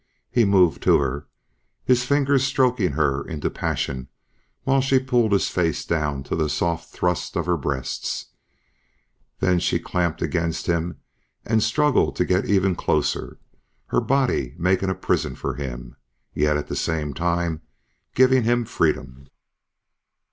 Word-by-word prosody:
He 120 Hz, -2 st, +3 dB
moved 90 Hz, -8 st, +3 dB
to -, -, +5 dB
her, 70 Hz, +1 st, -2 dB, 0.6 s
his 125 Hz, -1 st, +3 dB
fingers 140 Hz, 0 st, +2 dB
stroking 125 Hz, -, +1 dB
her 70 Hz, -2 st, +1 dB
into 80 Hz, -5 st, -4 dB
passion 65 Hz, -2 st, -3 dB, 0.6 s
while 135 Hz, 0 st, +3 dB
she 135 Hz, 0 st, +3 dB
pulled 125 Hz, -4 st, +1 dB
his 100 Hz, -, +2 dB
face 85 Hz, -3 st, -1 dB
down 75 Hz, -4 st, -1 dB
to -, -, -3 dB
the 80 Hz, -2 st, 0 dB
soft 85 Hz, +2 st, -2 dB
thrust 90 Hz, -1 st, -1 dB
of -, -, -1 dB
her 90 Hz, 0 st, +2 dB
breasts. 70 Hz, -4 st, -3 dB, 1.1 s
Then 90 Hz, -1 st, +3 dB
she -, -, 0 dB
was -, -, -11 dB
clamped 85 Hz, -2 st, -1 dB
against 85 Hz, -2 st, -1 dB
him 85 Hz, 0 st, -1 dB, 0.5 s
and 110 Hz, 0 st, +2 dB
struggling 145 Hz, +6 st, +2 dB
to 90 Hz, -, +1 dB
get 90 Hz, +2 st, +1 dB
even 95 Hz, -2 st, +2 dB
closer, -, -, -1 dB, 0.5 s
her -, -, +2 dB
body 125 Hz, -, 0 dB
making 95 Hz, +2 st, +1 dB
a 95 Hz, -, -1 dB
prison -, -, -1 dB
for -, -, -3 dB
him... 60 Hz, -4 st, -7 dB, 0.4 s
yet 75 Hz, 0 st, +2 dB
at 75 Hz, -, -3 dB
the -, -, -5 dB
same 75 Hz, -3 st, -2 dB
time 85 Hz, 0 st, -1 dB, 0.5 s
giving 130 Hz, 0 st, +5 dB
him 120 Hz, +1 st, +1 dB
freedom. 70 Hz, -, -1 dB
85 Hz, 150 wpm, -23 LUFS, 75-120 Hz, 1.1 s, to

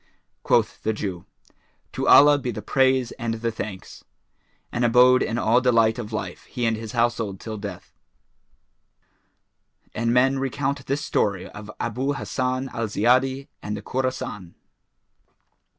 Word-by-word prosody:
Quoth -, -, +1 dB
the 110 Hz, -, 0 dB
Jew, 95 Hz, -5 st, -5 dB, 0.7 s
"To -, -, -2 dB
Allah 145 Hz, 0 st, +7 dB
be 125 Hz, -, -4 dB
the 110 Hz, -3 st, -5 dB
praise 130 Hz, 0 st, +2 dB
and 115 Hz, -1 st, -1 dB
the 115 Hz, +1 st, -2 dB
thanks!" 105 Hz, -4 st, -8 dB, 0.7 s
and 120 Hz, -, -1 dB
abode 125 Hz, +2 st, +5 dB
in 115 Hz, -, -1 dB
all 120 Hz, +2 st, +3 dB
delight 115 Hz, -2 st, +3 dB
of 110 Hz, -2 st, -6 dB
life 90 Hz, -5 st, -5 dB
he 125 Hz, -3 st, -3 dB
and 115 Hz, -1 st, +1 dB
his 110 Hz, +1 st, -7 dB
household 115 Hz, -5 st, 0 dB
till 110 Hz, -1 st, -6 dB
death. 100 Hz, -3 st, -8 dB, 2.0 s
And 115 Hz, +1 st, 0 dB
men 130 Hz, +2 st, +3 dB
recount 135 Hz, +1 st, -2 dB
this 140 Hz, +2 st, -1 dB
story 100 Hz, -3 st, 0 dB
of 105 Hz, +1 st, -10 dB
ABU 130 Hz, +5 st, -1 dB
HASSAN 130 Hz, -1 st, -2 dB
AL 115 Hz, -1 st, -2 dB
ZIYADI 130 Hz, +6 st, +1 dB
AND 105 Hz, 0 st, -4 dB
THE 100 Hz, -, -9 dB
KHORASAN. 130 Hz, -9 st, -4 dB
120 Hz, 140 wpm, -24 LUFS, 110-130 Hz, 2.0 s, Allah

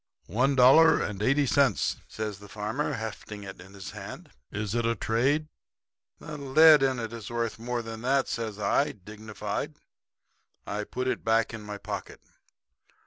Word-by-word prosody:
"'One 135 Hz, +6 st, +1 dB
dollar 135 Hz, +6 st, +7 dB
and 105 Hz, -1 st, -3 dB
eighty 140 Hz, +5 st, +3 dB
cents,' 130 Hz, -, +2 dB
says 105 Hz, -3 st, -5 dB
the 105 Hz, 0 st, -13 dB
farmer 110 Hz, +8 st, -2 dB
hefting 110 Hz, -3 st, -6 dB
it 95 Hz, -2 st, -9 dB
in 95 Hz, +2 st, -14 dB
his 95 Hz, -1 st, -8 dB
hand. -, -, -9 dB, 0.2 s
'Is 105 Hz, 0 st, -3 dB
it 120 Hz, 0 st, +1 dB
a 115 Hz, 0 st, +1 dB
trade?' 135 Hz, +9 st, +1 dB, 0.7 s
"'The 150 Hz, -1 st, -8 dB
lead 150 Hz, +2 st, +7 dB
in 135 Hz, -1 st, +2 dB
it 115 Hz, -1 st, -4 dB
is 115 Hz, -3 st, -7 dB
worth 115 Hz, -1 st, -2 dB
more 120 Hz, 0 st, -3 dB
than 115 Hz, 0 st, -7 dB
that,' 135 Hz, +2 st, +2 dB
says 110 Hz, -3 st, -3 dB
I, 140 Hz, +7 st, +1 dB
dignified. 105 Hz, +2 st, -6 dB, 0.9 s
I 105 Hz, 0 st, -3 dB
put 125 Hz, +3 st, -3 dB
it -, -, -1 dB
back 115 Hz, +1 st, +2 dB
in 110 Hz, -, -6 dB
my 105 Hz, -1 st, -6 dB
pocket. -, -, -6 dB
115 Hz, 165 wpm, -28 LUFS, 105-135 Hz, 0.9 s, dollar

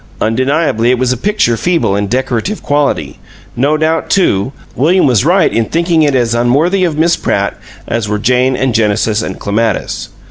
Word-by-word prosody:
Undeniably, 130 Hz, +1 st, 0 dB
it 125 Hz, -, +2 dB
was 130 Hz, 0 st, +1 dB
a -, -, -3 dB
picture 185 Hz, -, 0 dB
feeble 165 Hz, -, 0 dB
in 100 Hz, 0 st, -1 dB
decorative 130 Hz, -, -2 dB
quality; 140 Hz, -, -1 dB, 0.4 s
no 145 Hz, +5 st, +1 dB
doubt, 160 Hz, +1 st, -1 dB
too, 130 Hz, -, +1 dB, 0.2 s
William 175 Hz, +8 st, +2 dB
was 125 Hz, -5 st, +2 dB
right 175 Hz, +3 st, +2 dB
in 115 Hz, -, +1 dB
thinking 165 Hz, +4 st, +1 dB
it 145 Hz, -3 st, +2 dB
as 120 Hz, -2 st, +1 dB
unworthy 145 Hz, +11 st, +1 dB
of 165 Hz, -4 st, -1 dB
Miss 170 Hz, +2 st, +3 dB
Pratt, -, -, -1 dB, 0.3 s
as 115 Hz, -2 st, -2 dB
were 105 Hz, -, 0 dB
Jane 125 Hz, +4 st, +1 dB
and 130 Hz, -1 st, -1 dB
Genesis 110 Hz, 0 st, +1 dB
and -, -, -5 dB
Clematis. 110 Hz, +1 st, -2 dB
130 Hz, 175 wpm, -13 LUFS, 115-160 Hz, 0.4 s, Miss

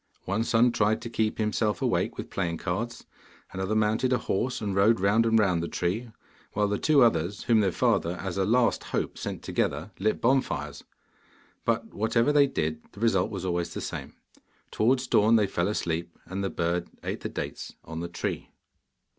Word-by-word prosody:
One 100 Hz, +4 st, 0 dB
son 115 Hz, +1 st, +4 dB
tried 110 Hz, 0 st, +2 dB
to 115 Hz, -, -6 dB
keep 110 Hz, -2 st, 0 dB
himself 105 Hz, 0 st, 0 dB
awake -, -, 0 dB
with -, -, -6 dB
playing 85 Hz, -4 st, -1 dB
cards; 105 Hz, +8 st, -3 dB, 0.5 s
another 95 Hz, +3 st, -2 dB
mounted 110 Hz, +4 st, +2 dB
a 125 Hz, -, +4 dB
horse 125 Hz, +5 st, -1 dB
and 100 Hz, -3 st, -2 dB
rode 100 Hz, +2 st, +4 dB
round 105 Hz, +4 st, +3 dB
and 115 Hz, 0 st, +4 dB
round 95 Hz, -6 st, +2 dB
the 85 Hz, -, -2 dB
tree, 100 Hz, +10 st, -2 dB, 0.4 s
while 105 Hz, 0 st, +2 dB
the 105 Hz, 0 st, -1 dB
two 150 Hz, -4 st, +5 dB
others, 95 Hz, -3 st, +1 dB
whom 115 Hz, -2 st, +4 dB
their 100 Hz, -3 st, +2 dB
father 85 Hz, +1 st, +1 dB
as 95 Hz, -1 st, -4 dB
a 95 Hz, -, +1 dB
last 115 Hz, +4 st, +2 dB
hope -, -, -2 dB
sent -, -, -5 dB
together, 75 Hz, +9 st, -1 dB
lit 110 Hz, +3 st, +1 dB
bonfires. 80 Hz, -, 0 dB, 0.8 s
But 115 Hz, -1 st, -1 dB
whatever 115 Hz, +6 st, +2 dB
they 145 Hz, -1 st, +6 dB
did, 80 Hz, -, -2 dB
the -, -, -12 dB
result 105 Hz, -5 st, +2 dB
was 95 Hz, -3 st, -5 dB
always 85 Hz, -1 st, -2 dB
the -, -, -2 dB
same. -, -, -6 dB, 0.6 s
Towards 125 Hz, +4 st, +2 dB
dawn 110 Hz, -2 st, +4 dB
they 110 Hz, -2 st, +4 dB
fell 85 Hz, -2 st, -1 dB
asleep, 85 Hz, -4 st, -2 dB
and 95 Hz, +2 st, -4 dB
the 95 Hz, -, 0 dB
bird 85 Hz, +1 st, -1 dB
ate -, -, -3 dB
the -, -, -5 dB
dates -, -, -6 dB
on 80 Hz, 0 st, -6 dB
the 85 Hz, +1 st, -4 dB
tree. 85 Hz, -, -4 dB
105 Hz, 190 wpm, -27 LUFS, 90-115 Hz, 0.8 s, they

